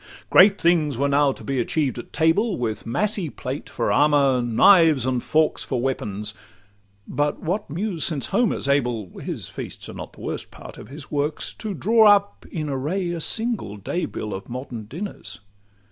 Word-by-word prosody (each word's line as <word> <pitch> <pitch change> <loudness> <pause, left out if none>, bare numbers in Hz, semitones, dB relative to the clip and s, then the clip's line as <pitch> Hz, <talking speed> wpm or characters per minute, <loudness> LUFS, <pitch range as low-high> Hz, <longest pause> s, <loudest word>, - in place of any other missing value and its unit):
Great 200 +2 +7
things 160 -6 +2
were 140 +2 +1
now 140 0 +3
to - - -10
be 135 -2 -2
achieved 135 +1 0
at - - -10
table, 180 +7 +2
With 110 -3 -3
massy 195 - -1
plate 135 +1 -6
for - - -1
armour, 140 -3 +4
knives 150 - +5
and 130 -2 0
forks 155 +4 +1
For 130 - -2
weapons; 105 -5 -3 0.7
but 145 0 -1
what 190 +6 -2
Muse 175 +1 -2
since 145 -8 0
Homer 240 - +1
's - - -3
able 120 -8 0
(His - - -5
feasts - - -7
are - - -7
not - - -8
the - - -15
worst - - -4
part - - -12
of - - -10
his 140 +2 -10
works) 145 +1 -1
To 215 -3 -5
draw 220 +5 +4
up 205 -1 +3
in 155 -3 -3
array 155 +7 -2
a 170 -1 -4
single 220 - -1
day 170 - -2
bill 105 -2 -5
Of 95 +1 -7
modern 120 -3 -6
dinners? 170 - -7
145 Hz, 180 wpm, -23 LUFS, 125-180 Hz, 0.7 s, Great